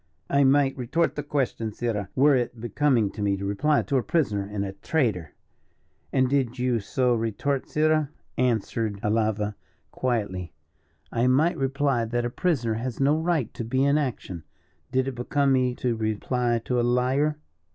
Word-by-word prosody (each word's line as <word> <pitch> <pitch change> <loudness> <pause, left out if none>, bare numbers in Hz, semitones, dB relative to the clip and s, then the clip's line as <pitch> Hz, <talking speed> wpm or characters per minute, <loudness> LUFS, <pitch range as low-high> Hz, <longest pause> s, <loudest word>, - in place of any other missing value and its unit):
"I 140 0 +4
might 135 0 +4
retort 145 +7 0
the 150 - -3
question, 135 -6 -2
sirrah, 105 -3 -3
were 140 +2 +5
it 120 -2 -2
becoming 120 -2 +1
me 100 -1 +1
to 100 - -5
reply 145 +10 +1
to 140 - 0
a - - +2
prisoner 105 -12 0
and 100 -1 -2
a 95 - -4
traitor." 100 - -1 0.8
"And 130 -1 +3
did 130 -2 0
you 125 -2 +1
so 125 +4 +1
retort, 120 +5 -1
sirrah," 155 -1 +2 0.3
answered 115 -3 0
Alava 105 -1 0 0.4
quietly, 100 -8 -2 0.6
"I 120 +2 +1
might 150 +7 +3
reply 135 -3 0
that 120 +1 -1
a 120 - -2
prisoner 125 -9 0
has 120 +2 -4
no 140 +2 +3
right 160 -6 0
to - - -5
be 130 +4 0
in 140 +2 +3
action, 115 - -4 0.5
did 130 0 +1
it 135 - -2
become 135 +3 +1
me 125 -1 +2
to 125 -2 -1
reply 115 +2 0
to 125 -1 0
a - - +3
liar." 130 +5 +1
125 Hz, 165 wpm, -26 LUFS, 110-140 Hz, 0.8 s, were